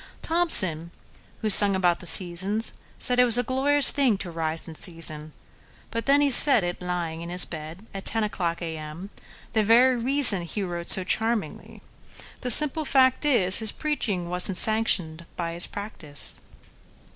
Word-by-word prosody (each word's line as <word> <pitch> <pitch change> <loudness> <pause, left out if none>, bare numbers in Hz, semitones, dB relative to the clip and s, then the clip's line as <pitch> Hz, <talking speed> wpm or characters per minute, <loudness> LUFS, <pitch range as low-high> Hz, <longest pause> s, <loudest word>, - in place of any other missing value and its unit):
Thomson, 190 - +1 0.5
who 215 - -2
sung 200 0 +5
about 175 -2 -1
the 180 - -10
"Seasons," 190 +6 0 0.3
saidIt 250 0 +1
was 240 -1 0
a 245 - -2
glorious 275 +3 0
thing 265 -8 -1
to 185 -3 -9
rise 165 0 -5
in 165 - -11
season; 155 -3 -4 0.6
But 230 +2 -7
then 285 +1 +2
he 285 -1 0
said 265 -4 +6
it—lying—in 175 -2 -7
his 180 +1 +3
bed, 160 +5 -11
At 195 -1 -9
ten 225 -1 +1
o'clock 175 -5 -5
A.M.,—the 165 +7 -9
very 240 +3 +1
reasonHe 215 - +1
wrote 170 -1 -8
so 190 - +7
charmingly. 225 +3 -6 0.6
The 250 - -7
simple 300 +5 +6
fact 260 -1 0
is, 195 -10 +2
His 220 -2 +2
preaching 205 - -6
was 180 +1 +2
n't 190 - +6
sanctioned 180 -8 +3
by 170 -1 -6
his 170 - -3
practice. 170 -8 -7
195 Hz, 150 wpm, -22 LUFS, 170-245 Hz, 0.6 s, so